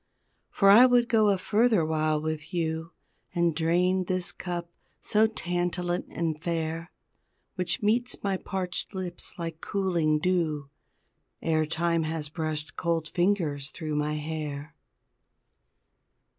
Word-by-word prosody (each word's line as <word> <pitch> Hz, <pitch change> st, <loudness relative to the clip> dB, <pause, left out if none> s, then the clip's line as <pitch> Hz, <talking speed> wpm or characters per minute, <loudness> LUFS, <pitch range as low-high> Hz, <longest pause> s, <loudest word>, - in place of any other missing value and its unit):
For 195 Hz, -1 st, +5 dB
I 240 Hz, +5 st, +9 dB
would 245 Hz, -1 st, +4 dB
go 220 Hz, -4 st, +4 dB
a 195 Hz, -, +3 dB
further 215 Hz, -1 st, +3 dB
while 155 Hz, -1 st, +1 dB
with 155 Hz, +1 st, -4 dB
you, 160 Hz, -1 st, -1 dB, 0.5 s
And 170 Hz, -2 st, +2 dB
drain 180 Hz, +3 st, +2 dB
this 185 Hz, 0 st, -1 dB
cup 175 Hz, -1 st, -5 dB, 0.3 s
so 215 Hz, +1 st, +3 dB
tantalant 175 Hz, -3 st, -1 dB
and 160 Hz, -2 st, -2 dB
fair 165 Hz, 0 st, -2 dB, 0.6 s
Which 180 Hz, +2 st, -2 dB
meets 240 Hz, +4 st, +1 dB
my 195 Hz, -1 st, 0 dB
parched 185 Hz, +1 st, -3 dB
lips 180 Hz, -2 st, -4 dB
like 165 Hz, -2 st, -5 dB
cooling 175 Hz, -6 st, +1 dB
dew, 155 Hz, -4 st, 0 dB, 0.7 s
Ere 155 Hz, -1 st, +1 dB
time 170 Hz, +1 st, +1 dB
has 155 Hz, -1 st, -2 dB
brushed 155 Hz, -1 st, -3 dB
cold 165 Hz, -2 st, -1 dB
fingers 170 Hz, -7 st, 0 dB
thru 155 Hz, -2 st, -5 dB
my 150 Hz, +1 st, 0 dB
hair! 150 Hz, 0 st, -5 dB
170 Hz, 125 wpm, -28 LUFS, 155-185 Hz, 0.7 s, I